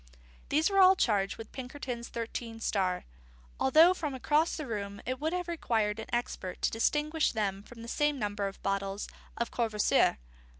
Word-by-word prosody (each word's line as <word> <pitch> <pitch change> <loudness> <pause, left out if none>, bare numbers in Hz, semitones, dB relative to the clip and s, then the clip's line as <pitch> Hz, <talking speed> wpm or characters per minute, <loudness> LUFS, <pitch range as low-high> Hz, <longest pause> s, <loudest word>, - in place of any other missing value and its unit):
These 310 +6 +2
were 390 - +3
all 375 0 +8
charged 200 - +1
with 225 -1 -9
Pinkerton's 250 -2 -6
Thirteen 230 0 -5
Star, 185 -4 0 0.5
although 320 +7 +6
from 300 -7 -4
across 300 +5 +1
the 305 - -4
room 200 -4 -4
it 255 +1 -2
would 315 +2 -1
have 360 0 -2
required 225 -10 0
an 220 - -7
expert 240 -6 -3
to - - +3
distinguish 300 +7 +1
them 200 -3 -1
from 230 +2 -12
the - - -8
same 295 +3 +1
number 205 -3 -2
of 195 - -8
bottles 195 0 -2 0.3
of 235 - -2
Courvoisier. 220 -3 +2
235 Hz, 170 wpm, -30 LUFS, 210-295 Hz, 0.5 s, all